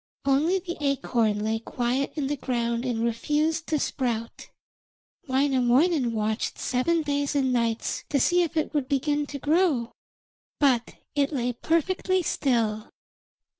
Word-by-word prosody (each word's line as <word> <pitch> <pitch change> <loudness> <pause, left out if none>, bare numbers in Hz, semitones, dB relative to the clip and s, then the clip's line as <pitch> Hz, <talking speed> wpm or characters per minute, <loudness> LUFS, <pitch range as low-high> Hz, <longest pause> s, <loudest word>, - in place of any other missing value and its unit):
Only 295 +7 +3
the 350 -2 -5
acorn 235 -7 +1
lay 220 +1 0
quiet 245 +4 -2
in 295 -3 -1
the 290 +2 -1
ground 235 -2 -2
and 235 -3 -1
refused 300 +7 0
to 310 - +1
sprout. 235 -5 -3 0.8
Wainamoinen 265 +1 +2
watched 215 +1 -1
seven 320 +6 0
days 285 0 -1
and 265 -2 +2
nights 230 -2 -1
to 280 - +1
see 350 +7 +3
if 335 -1 -2
it 310 - 0
would 290 -4 0
begin 290 +1 0
to 285 - -6
grow, 290 -5 +1 0.7
but 255 -5 +2 0.2
it 285 0 +1
lay 250 -4 -1
perfectly 360 +7 0
still. 225 -8 0
275 Hz, 135 wpm, -26 LUFS, 235-300 Hz, 0.8 s, Only